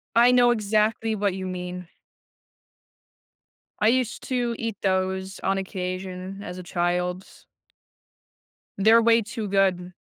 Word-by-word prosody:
I 235 +2 +6
know 245 -1 +5
exactly 215 0 +1
what 205 -2 0
you 185 0 -5
mean. 180 -1 -6 1.9
I 215 - +4
used 240 0 0
to 245 -2 0
eat 230 -2 -3
those 190 0 -1
on 195 0 0
occasion 185 0 -5
as 180 -2 -7
a - - -6
child. 180 +1 -1 1.5
They're 220 +3 +6
way 230 0 +4
too 220 -1 -5
good. 185 -2 +1
195 Hz, 120 wpm, -25 LUFS, 185-225 Hz, 1.9 s, I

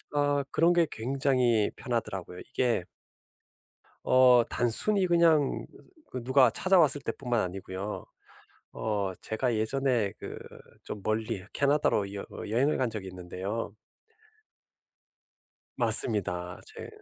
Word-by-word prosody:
어. 145 -1 +1
그런 170 +2 +3
게 170 -1 +3
굉장히 125 -2 +1
편하더라고요. 100 -7 -4
이게 120 -8 -1 1.2
어 125 -2 +5
단순히 185 - +3
그냥 165 -5 +2 0.4
그 125 - -6
누가 130 0 +4
찾아왔을 155 - +3
때뿐만 125 -4 -2
아니고요. 95 +2 -6 0.7
어. 100 -3 -2
제가 115 +1 -2
예전에 120 -2 0
그 - - -8 0.5
좀 105 - -7
멀리 110 -2 -2
캐나다로 140 -8 +1
여 100 - -6 0.2
여행을 125 +8 +1
간 130 -3 0
적이 105 -4 -7
있는데요. 95 +4 -6 2.0
맞습니다. 100 -7 +3
제 - - -10
120 Hz, 230 characters per minute, -28 LUFS, 100-140 Hz, 2.0 s, 어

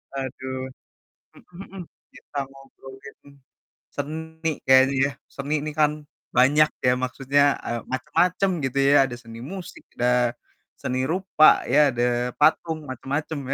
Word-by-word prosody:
aduh. 130 -1 -5 0.8
Mhm 180 - -18
mhm, 195 -1 -11 0.3
kita 145 - -10
ngobrolin 135 0 -14 0.8
seni 160 +3 -4 0.2
kayaknya 130 +1 +5
ya. 140 - -2 0.2
Seni 140 +2 -3
ini 155 +1 -4
kan, 150 -1 +4 0.4
banyak 145 +5 +5 0.2
ya, 125 - +5
maksudnya, 135 +2 0 0.2
eee, 120 0 -2
macam-macam 180 +8 +1 0.2
gitu 130 +1 -3
ya. 145 - +5
Ada 130 - -7
seni 115 0 -11
musik, 190 -2 -9
ada 125 -1 +2 0.4
seni 130 0 -3
rupa, 180 -4 +4
ya 145 +1 +5
ada 120 0 0 0.3
patung, 160 +1 +2
macam-macam 145 +4 -4
140 Hz, 125 wpm, -24 LUFS, 130-155 Hz, 0.8 s, kayaknya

